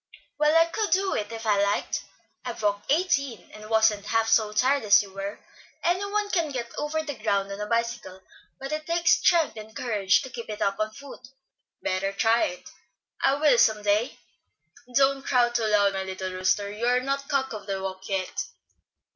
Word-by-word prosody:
"Well, 300 +1 +3
I 330 - +6
could 420 +5 -2
do 385 +1 +2
it 210 +1 -3
if 225 0 -7
I 205 -2 +3
liked. 200 0 -1 0.4
I've 240 -3 -6
walked 205 +3 0
eighteen, 280 - 0
and 215 0 -11
wasn't 220 -2 +2
half 225 -1 +1
so 220 -1 +3
tired 260 +6 +2
as 205 -1 +5
you 195 -1 -13
were. 195 +1 -5 0.4
Any 355 +3 +1
one 410 0 -1
can 335 -5 +1
get 245 -4 -5
over 310 +1 -2
the 295 -2 -4
ground 200 -5 -1
on 200 - -6
a 210 - -3
bicycle, 230 -5 -2 0.4
but 270 +1 -6
it 305 0 -4
takes 335 0 +2
strength 330 -8 +2
and 215 +1 -10
courage 205 -6 +1
to 260 - -9
keep 235 -2 -8
it 210 0 -5
up 195 0 0
on 215 0 0
foot." 275 0 -12 0.6
"Better 190 +1 -1
try 225 +3 +3
it." 180 - -7 0.6
"I 270 - +4
will, 285 -4 +4
some 215 -1 +3
day." 210 +5 +1 0.8
"Don't 275 0 +3
crow 245 -3 +2
too 235 -2 0
loud, 205 -2 +3
my 195 - -2
little 190 0 -5
rooster; 185 +2 0
you 220 +3 -3
are 250 +1 +3
not 275 +2 -3
cock 270 -3 0
of 210 -2 -8
the 195 -1 -2
walk 190 0 -6
yet." 190 -2 -2
225 Hz, 195 wpm, -26 LUFS, 205-275 Hz, 0.8 s, I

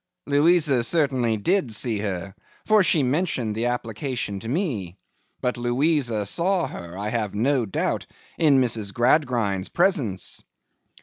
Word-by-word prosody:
'Louisa 145 -3 +3
certainly 130 -5 +1
did 170 - 0
see 110 0 0
her, 95 -2 -4 0.3
for 215 -1 +5
she 165 -5 +3
mentioned 135 -5 -1
the 115 +3 -1
application 120 -2 -3
to 115 - -7
me. 120 - -2 0.4
But 125 0 -1
Louisa 120 -2 +1
saw 175 - +1
her, 85 +1 -8
I 105 +2 -3
have 105 -3 -2
no 125 +1 +1
doubt, 95 - -2 0.3
in 145 -5 +5
Mrs. 110 -5 0
Gradgrind's 120 -7 +1
presence. 140 - 0
120 Hz, 130 wpm, -24 LUFS, 105-150 Hz, 0.4 s, for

